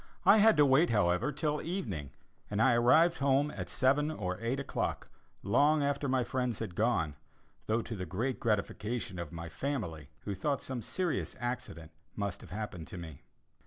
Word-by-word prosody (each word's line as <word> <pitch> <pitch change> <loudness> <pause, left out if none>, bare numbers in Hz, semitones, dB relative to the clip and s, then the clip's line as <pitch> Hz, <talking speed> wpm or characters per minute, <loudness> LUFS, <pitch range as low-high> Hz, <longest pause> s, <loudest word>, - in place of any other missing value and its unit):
I - - +8
had 220 -3 +6
to 145 - +7
wait, 140 +5 +4
however, 90 +4 +2
till 150 0 -1
evening, 110 - -4 0.4
and 105 - -2
I 125 +2 +5
arrived 155 +9 +5
home 140 +1 +2
at - - -6
seven 140 +3 +2
or 90 -11 -3
eight 120 +4 -1
o'clock, 140 - -3 0.3
long 145 +9 +3
after 140 0 0
my 130 -1 +2
friends 125 -2 -1
had 110 -6 -5
gone, 95 -7 +1 0.5
though 110 +1 +1
to 115 - -5
the 90 -3 -5
great 120 +10 -2
gratification 105 -1 -2
of 85 -2 -5
my 85 0 -6
family, 85 - -4
who 100 - -4
thought 140 +9 -1
some 130 -2 -4
serious 180 +6 -2
accident 85 -10 -5 0.2
must 100 -3 -3
have - - -12
happened 90 -4 -5
to - - -8
me. 80 -5 -8
120 Hz, 175 wpm, -32 LUFS, 95-140 Hz, 0.5 s, I